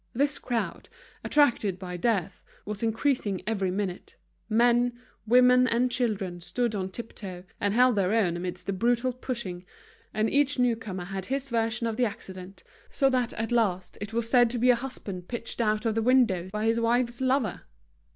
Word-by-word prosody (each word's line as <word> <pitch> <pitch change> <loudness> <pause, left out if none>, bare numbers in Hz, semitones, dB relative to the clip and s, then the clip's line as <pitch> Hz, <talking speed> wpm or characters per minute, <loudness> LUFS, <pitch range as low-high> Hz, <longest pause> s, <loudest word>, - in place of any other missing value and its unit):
This 285 +4 +1
crowd, 240 -3 -3 0.3
attracted 235 -10 +2
by 180 -1 -6
death, 195 -1 -1 0.2
was 210 0 -5
increasing 225 -3 0
every 200 -4 0
minute; 190 -1 -4 0.3
men, 240 +2 +3 0.3
women, 250 +2 +6
and 245 +1 +1
children 195 -8 -1
stood 235 +5 -1
on 190 -2 -2
tip 230 +4 -8
toe, 180 -3 -8 0.2
and 205 +1 0
held 250 -2 +4
their 190 -1 +2
own 205 -7 +2
amidst 180 0 -5
a 195 - 0
brutal 240 +5 +1
pushing, 235 -8 -5 0.5
and 215 +1 +1
each 285 +3 +2
new 245 -2 +3
comer 190 -5 -6
had 190 0 -5
his 270 0 -3
version 230 0 0
of 225 -1 -2
the 250 - +3
accident, 190 -3 -8 0.3
so 270 -1 +2
that 250 -2 +1
at 225 +2 -3
last 195 -6 0
it 205 0 -5
was 230 0 -1
said 240 -1 +5
to 245 - -2
be 250 +2 +5
a - - +4
husband 210 -8 -6
pitched 235 0 -4
out 215 0 +1
of 225 - +2
the 225 - 0
window 225 -7 +3
by 210 +1 -2
his 225 +1 +2
wife's 240 +1 +1
lover. 260 -6 +1
225 Hz, 180 wpm, -27 LUFS, 195-245 Hz, 0.5 s, women